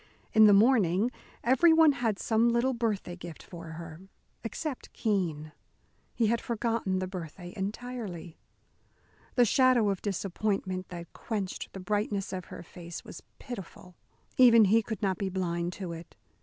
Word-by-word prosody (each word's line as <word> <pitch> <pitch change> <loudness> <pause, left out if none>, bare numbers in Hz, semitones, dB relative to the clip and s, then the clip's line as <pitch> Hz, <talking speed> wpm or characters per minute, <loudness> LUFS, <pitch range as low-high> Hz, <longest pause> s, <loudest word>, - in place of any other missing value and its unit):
In 220 -1 +8
the - - +7
morning 210 -1 +4 0.3
everyone 320 +5 +6
had 235 -6 -1
some 225 +3 +2
little 235 +3 +2
birthday 215 -7 -2
gift 175 -3 -10
for 165 -2 -9
her, 165 0 -9 0.4
except 260 +5 -5
Keene. 170 -8 -1 0.6
He 230 - +2
had 230 +2 +1
forgotten 230 -4 -1
the 185 - -1
birthday 175 -1 -8
entirely. 200 -4 -5 1.0
The 245 - +5
shadow 245 -2 +4
of 195 - -4
disappointment 195 -1 -2
that 170 -1 -9
quenched 205 -5 -4
the 195 - -7
brightness 205 +1 -2
of 185 -1 -4
her - - -9
face 170 -1 -9
was - - -9 0.2
pitiful. 190 -6 -9 0.4
Even 230 -4 +8
he 220 +4 +4
could 220 -1 -6
not 190 -2 0
be 195 - -1
blind 175 -2 -2
to 185 -2 -6
it. 165 0 -10
200 Hz, 145 wpm, -29 LUFS, 180-230 Hz, 1.0 s, In